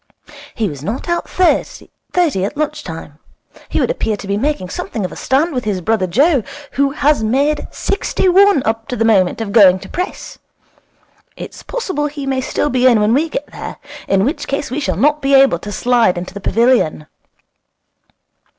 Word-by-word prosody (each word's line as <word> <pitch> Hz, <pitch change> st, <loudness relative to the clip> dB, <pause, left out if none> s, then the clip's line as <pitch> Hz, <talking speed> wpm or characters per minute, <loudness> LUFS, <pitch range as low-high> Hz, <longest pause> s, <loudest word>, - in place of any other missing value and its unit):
'He 220 Hz, -3 st, 0 dB
was 145 Hz, -5 st, -7 dB
not 220 Hz, -, -4 dB
out 345 Hz, 0 st, -2 dB
thirty 350 Hz, -, 0 dB
at 210 Hz, +9 st, -3 dB
lunch 305 Hz, -1 st, -2 dB
time. 160 Hz, -3 st, -9 dB, 0.5 s
He -, -, -1 dB
would -, -, +1 dB
appear 220 Hz, -, -2 dB
to 200 Hz, -, -9 dB
be 200 Hz, +1 st, -1 dB
making 220 Hz, -5 st, -2 dB
something 205 Hz, +2 st, -4 dB
of -, -, -5 dB
a -, -, -9 dB
stand 295 Hz, +6 st, 0 dB
with 250 Hz, -2 st, -2 dB
his 205 Hz, -3 st, -1 dB
brother 190 Hz, +1 st, 0 dB
Joe, 275 Hz, -, +3 dB, 0.3 s
who 275 Hz, +2 st, +1 dB
has 290 Hz, -3 st, +1 dB
made 280 Hz, +7 st, 0 dB
sixty 395 Hz, -, -1 dB
one 385 Hz, -5 st, +5 dB
up 225 Hz, 0 st, -2 dB
to 250 Hz, -, -3 dB
the 225 Hz, -, 0 dB
moment 200 Hz, -2 st, +2 dB
of 210 Hz, -3 st, -4 dB
going 195 Hz, -4 st, +6 dB
to -, -, -11 dB
press. 360 Hz, +1 st, -5 dB, 1.0 s
It's -, -, -9 dB
possible 375 Hz, -12 st, -3 dB
he 285 Hz, -1 st, -6 dB
may 265 Hz, -1 st, -1 dB
still 290 Hz, +3 st, -1 dB
be 255 Hz, 0 st, +3 dB
in 235 Hz, -4 st, +5 dB
when 210 Hz, +2 st, +2 dB
we 310 Hz, +5 st, +1 dB
get 295 Hz, -, -4 dB
there. -, -, -7 dB, 0.3 s
In 195 Hz, 0 st, +2 dB
which 290 Hz, +6 st, -2 dB
case 275 Hz, -2 st, -3 dB
we 270 Hz, -, -2 dB
shall 185 Hz, -, -2 dB
not 295 Hz, +7 st, +2 dB
be 275 Hz, 0 st, +3 dB
able 270 Hz, -10 st, +5 dB
to 205 Hz, -, -7 dB
slide 230 Hz, -3 st, +2 dB
into 180 Hz, +1 st, -6 dB
the 200 Hz, -, -8 dB
pavilion.' 230 Hz, -10 st, +2 dB
250 Hz, 190 wpm, -17 LUFS, 200-295 Hz, 1.0 s, going